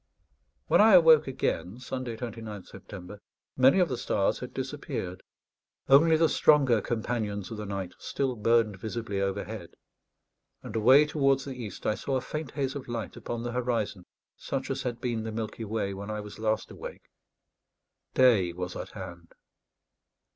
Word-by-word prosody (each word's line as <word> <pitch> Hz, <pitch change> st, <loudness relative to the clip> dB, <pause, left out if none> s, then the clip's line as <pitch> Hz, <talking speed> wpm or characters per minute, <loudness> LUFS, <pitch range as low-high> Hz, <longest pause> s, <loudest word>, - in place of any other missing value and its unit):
When -, -, +5 dB
I 215 Hz, -2 st, +8 dB
awoke 160 Hz, -4 st, +7 dB
again 100 Hz, -6 st, -2 dB
(Sunday, 125 Hz, -2 st, -5 dB
29th 110 Hz, -4 st, -7 dB
September), 100 Hz, +1 st, -10 dB, 0.3 s
many 130 Hz, +6 st, +5 dB
of 180 Hz, -2 st, +4 dB
the 125 Hz, -5 st, -3 dB
stars -, -, 0 dB
had -, -, -7 dB
disappeared; 90 Hz, 0 st, -5 dB, 0.7 s
only 160 Hz, +4 st, +7 dB
the 165 Hz, 0 st, +4 dB
stronger 135 Hz, -8 st, +4 dB
companions 110 Hz, -4 st, -3 dB
of 110 Hz, -, -5 dB
the 105 Hz, -1 st, -5 dB
night 95 Hz, -2 st, -4 dB
still 135 Hz, -2 st, -2 dB
burned 110 Hz, -2 st, +2 dB
visibly 110 Hz, -2 st, -3 dB
overhead; 100 Hz, -1 st, -4 dB, 0.9 s
and -, -, -8 dB
away 130 Hz, +7 st, +6 dB
towards 135 Hz, -3 st, +1 dB
the 135 Hz, -, -5 dB
east 115 Hz, -6 st, -8 dB
I -, -, +2 dB
saw 135 Hz, +5 st, -3 dB
a 130 Hz, -, +1 dB
faint 155 Hz, +2 st, -5 dB
haze 135 Hz, -2 st, -1 dB
of 140 Hz, -3 st, -7 dB
light 120 Hz, -2 st, -4 dB
upon 120 Hz, -1 st, -5 dB
the 120 Hz, -, -3 dB
horizon, 115 Hz, -6 st, -2 dB, 0.3 s
such 135 Hz, -1 st, -4 dB
as 135 Hz, -, -2 dB
had 120 Hz, -2 st, -4 dB
been 120 Hz, -3 st, -1 dB
the 110 Hz, -, -4 dB
Milky 110 Hz, 0 st, -4 dB
Way 105 Hz, -2 st, -2 dB
when 100 Hz, +2 st, -7 dB
I 105 Hz, 0 st, -3 dB
was 105 Hz, 0 st, -9 dB
last 110 Hz, 0 st, -1 dB
awake. -, -, -9 dB, 1.1 s
Day 110 Hz, -9 st, +5 dB
was 90 Hz, 0 st, -5 dB
at -, -, -6 dB
hand. 85 Hz, -1 st, -9 dB
115 Hz, 160 wpm, -28 LUFS, 105-130 Hz, 1.1 s, I